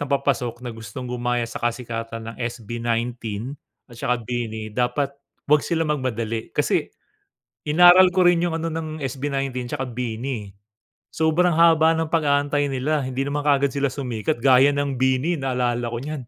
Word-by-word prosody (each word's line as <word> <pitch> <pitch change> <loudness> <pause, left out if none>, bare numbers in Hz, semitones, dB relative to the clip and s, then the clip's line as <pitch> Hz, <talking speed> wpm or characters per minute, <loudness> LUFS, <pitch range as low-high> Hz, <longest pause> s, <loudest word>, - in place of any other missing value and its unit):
na 145 - -1
papasok 125 -4 0
na 125 - -6
gustong 115 +3 -8
gumaya 120 -1 -1
sa - - -8
kasikatan 115 -1 -4
ng - - -16
SB19 115 +1 -3 0.3
at 120 - -14
saka 125 +1 0
BINI, 110 -2 -4
dapat 130 +3 +1 0.4
huwag 150 0 +4
sila 165 -2 0
magmadali. 115 -6 -2
Kasi, - - 0 0.8
inaral 175 +4 +8
ko 185 - +5
rin 175 -1 +5
yung 170 -2 0
ano 165 0 -2
ng 155 -2 -5
SB19 135 -1 -3
tsaka 130 - -3
BINI, 115 -2 -4
eh, 95 - -29 0.6
sobrang 160 +2 +2
haba 165 -1 +5
ng 160 -1 -2
pag-aantay 145 -2 +2
nila. 140 +3 0
Hindi 130 +1 -2
naman 145 +1 -2
kaagad 140 -1 +3
sila 140 0 0
sumikat. 125 -1 -3
Gaya 135 +2 +5
ng 140 -3 -1
BINI, 130 +6 +1
naalala 125 -2 -1
ko 115 0 -4
niyan, 145 -5 -6
130 Hz, 160 wpm, -23 LUFS, 120-150 Hz, 0.8 s, inaral